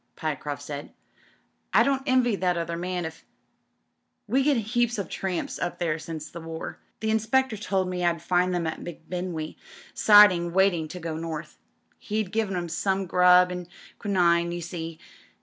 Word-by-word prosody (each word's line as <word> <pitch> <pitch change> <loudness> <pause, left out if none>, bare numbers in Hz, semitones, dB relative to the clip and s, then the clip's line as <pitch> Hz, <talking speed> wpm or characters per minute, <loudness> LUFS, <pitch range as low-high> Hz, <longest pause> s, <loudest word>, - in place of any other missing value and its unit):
'' - - -47
Pyecroft 145 -2 -4
swd. 145 -1 -6 0.9
"I - - +7
don't 275 -1 +1
envy 255 -4 +3
that 180 -2 +1
other 170 0 -2
«nan 180 0 -3
if 160 0 -8 0.5
" - - -50
"We 255 +6 +2
get 280 -1 +3
heaps 240 +2 0
of 195 -5 -4
tramps 185 -3 -3
up - - -2
there 165 -3 -1
since 155 -1 -6
the 170 - -8
war. 165 0 -7 0.2
The 220 0 0
inspector 225 +3 +2
told 195 -3 -1
me 180 -1 -3
I'd 170 -1 +2
find 180 +2 +1
'em 175 -1 -1
at 160 - -3
M'Bindwe 175 -1 -5 0.4
siding 185 -5 +6
waiting 185 -4 +3
to 180 - -8
go 160 -2 -4
North. 160 -1 -6 0.4
He'd 210 -3 -2
given 215 -4 0
'em 175 -1 -2
some 190 +4 -1
grub 180 0 +5
and 180 -1 -5 0.3
quinine, 170 -4 +2
you 175 0 -4
see. 165 -1 -6
180 Hz, 170 wpm, -26 LUFS, 165-205 Hz, 0.9 s, I